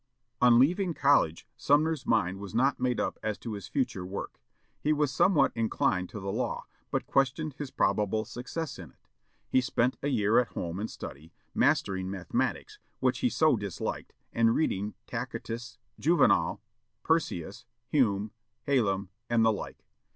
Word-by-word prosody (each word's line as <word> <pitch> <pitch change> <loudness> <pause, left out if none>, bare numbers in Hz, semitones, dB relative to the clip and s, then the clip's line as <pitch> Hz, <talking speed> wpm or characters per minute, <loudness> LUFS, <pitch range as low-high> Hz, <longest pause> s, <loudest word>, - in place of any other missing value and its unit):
On 120 -1 +7
leaving 175 +6 +3
college, 135 - +3
Sumner's 150 0 +2
mind 95 -4 +1
was 100 +1 -8
not 130 +3 +2
made 125 -1 0
up - - -2
as 110 -1 -2
to 115 - -6
his 100 -2 -6
future 100 -4 -1
work. 95 +2 -6 0.4
He 150 - +1
was 150 -2 +1
somewhat 150 -5 +4
inclined 95 -5 0
to 105 - -7
the 95 0 -3
law, - - -2 0.2
but - - -1
questioned 135 +3 +1
his 145 -3 -4
probable 105 0 +1
success 135 +6 -5
in 85 -5 -9
it. - - -29 0.4
He 130 - +3
spent 125 0 0
a 140 - -1
year 110 -5 +3
at 125 - -1
home 85 +2 -4
in 110 - -2
study, 80 -2 -9 0.2
mastering 95 -1 +1
mathematics, 95 -2 -2 0.2
which - - +1
he - - +2
so - - +3
disliked, - - -4 0.2
and 115 0 +3
reading 105 - 0
Tacitus, 120 -1 -5 0.2
Juvenal, 150 - +3 0.4
Persius, - - -1 0.2
Hume, 105 -7 +2 0.3
Hallam, 100 -8 +1 0.2
and 115 -1 +3
the 110 - +5
like. 105 - -6
115 Hz, 155 wpm, -29 LUFS, 100-135 Hz, 0.4 s, On